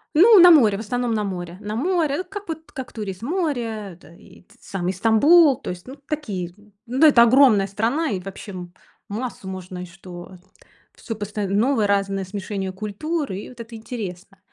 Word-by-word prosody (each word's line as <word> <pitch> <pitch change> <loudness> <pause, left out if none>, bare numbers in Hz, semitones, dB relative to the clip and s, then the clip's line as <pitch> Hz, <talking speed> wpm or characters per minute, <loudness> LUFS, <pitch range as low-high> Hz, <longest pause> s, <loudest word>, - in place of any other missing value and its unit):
Ну, 410 +6 +8
на 355 0 +9
море 225 -11 +5
в - - -7
основном, 245 +2 -2
на 210 - 0
море, 180 -3 -5
на 210 0 -5
море, 325 +3 0
как 400 +2 -9
вот 320 -2 -7
как 260 -3 -8
турист 210 -2 -6
море, 235 - -3
да, 160 - -17
и 170 - -18 0.2
сам, 180 -2 -5
и - - +2
Стамбул 270 - +5
то - - -5
есть 180 +5 -10
ну 265 - -8
такие, 200 - -4 0.3
ну 260 +6 +2
это 240 -6 +7
огромная 235 -5 +5
страна 230 - -1
и 190 - -2
вообще 195 +2 -9
м 180 -2 -8 0.4
массу 220 -2 -5
можно 185 -1 -7
и 180 - -6
что 180 0 -11 0.6
всё 225 - -6
поста 210 -1 -4
новое 215 +3 +2
разное 195 -1 0
смешение 195 0 -5
культур, 240 - -4
и 190 +2 -6
вот 245 -2 -14
это 230 0 -8
интересно. 200 -5 -7
215 Hz, 180 wpm, -22 LUFS, 190-270 Hz, 0.6 s, на